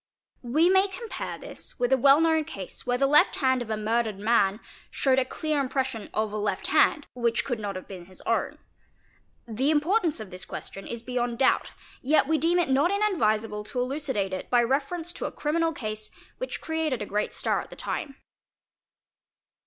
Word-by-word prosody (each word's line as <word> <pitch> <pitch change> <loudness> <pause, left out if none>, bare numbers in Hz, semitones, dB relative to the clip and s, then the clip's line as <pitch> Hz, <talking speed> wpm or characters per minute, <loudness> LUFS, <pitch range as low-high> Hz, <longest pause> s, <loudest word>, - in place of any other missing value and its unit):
We 295 +8 +3
may 380 +2 +5
compare 440 +4 -6
this - - -7
with 245 +1 +2
a - - +5
well 275 +3 +7
known 320 -1 +3
case 200 - -9
where 245 0 +2
the 275 - +3
left 295 +2 +5
hand 260 -2 +2
of 235 - -6
a 220 - -1
murdered 220 -1 0
man 205 -1 +2 0.3
showed 265 -1 +2
a 260 - +1
clear 305 +2 -2
impression 260 -4 -2
of 215 -1 -1
a - - -2
left 205 -1 -2
hand—which 240 -6 +2
could 245 -4 -2
not 200 -2 -4
have 185 - -7
been 185 -3 -9
his 185 +1 -13
own. - - -1 0.9
The 240 +5 0
importance 320 - +2
of 215 -3 -8
this 185 +1 -7
question 195 - -8
is 235 -1 -6
beyond 245 -1 -2
doubt, 265 - +2 0.3
yet 285 +1 +3
we 315 0 +2
deem 340 +2 +2
it 350 -5 +2
not 275 +5 +3
inadvisable 225 - +1
to 250 - -4
elucidate 250 -7 -1
it 185 - -5
by 240 -1 +4
reference 300 +7 -1
to - - -5
a - - -3
criminal 325 +2 0
case 215 -6 -5 0.3
which - - -4
created 320 -7 -1
a - - -5
great 210 +1 -1
stir - - 0
at - - -12
the - - -10
time. 280 -4 -4
255 Hz, 190 wpm, -27 LUFS, 215-310 Hz, 0.9 s, well